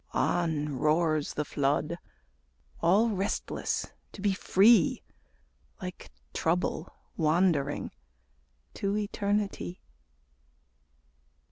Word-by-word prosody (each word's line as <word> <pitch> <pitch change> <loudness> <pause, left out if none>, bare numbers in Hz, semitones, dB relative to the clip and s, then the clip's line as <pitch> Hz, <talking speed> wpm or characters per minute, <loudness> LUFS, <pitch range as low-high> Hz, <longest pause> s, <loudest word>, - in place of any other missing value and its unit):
On 150 -5 0
roars 155 0 +1
the 150 - -1
flood, 145 +4 0 0.8
all 200 +7 +4
restless 200 -2 -2 0.3
to - - -11
be 200 -1 +2
free, 205 +5 +4 0.8
Like 185 -3 -7 0.2
Trouble 170 0 -1 0.3
wandering 155 -3 +1 0.8
to 200 +1 -1
Eternity. 200 - -2
170 Hz, 75 wpm, -29 LUFS, 150-200 Hz, 0.8 s, all